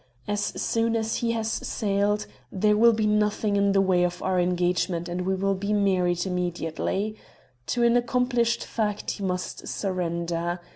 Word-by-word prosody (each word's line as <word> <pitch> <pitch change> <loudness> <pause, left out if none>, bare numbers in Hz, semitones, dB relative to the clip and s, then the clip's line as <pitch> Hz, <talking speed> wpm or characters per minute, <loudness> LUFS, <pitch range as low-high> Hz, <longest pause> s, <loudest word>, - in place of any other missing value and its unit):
As 205 0 -1 0.2
soon 230 0 +1
as 225 0 -1
he 230 -1 0
has 225 -1 -2
sailed 205 0 0 0.3
there 210 +2 +2
will 235 +2 +6
be 215 -1 0
nothing 210 0 +1
in 200 0 +3
the 195 0 +4
way 185 -2 +3
of 175 0 -1
our 185 -1 +1
engagement 175 -1 0
and 175 +1 -3
we 190 - +2
will 195 +1 +1
be 200 +2 -2
married 185 -3 +1
immediately. 180 +3 -2 0.5
To 240 - 0
an 235 0 +4
accomplished 245 -1 +1
fact 210 -2 -2
he 200 - -6
must 180 -1 -3
surrender. 175 -2 -2
200 Hz, 160 wpm, -26 LUFS, 180-215 Hz, 0.5 s, will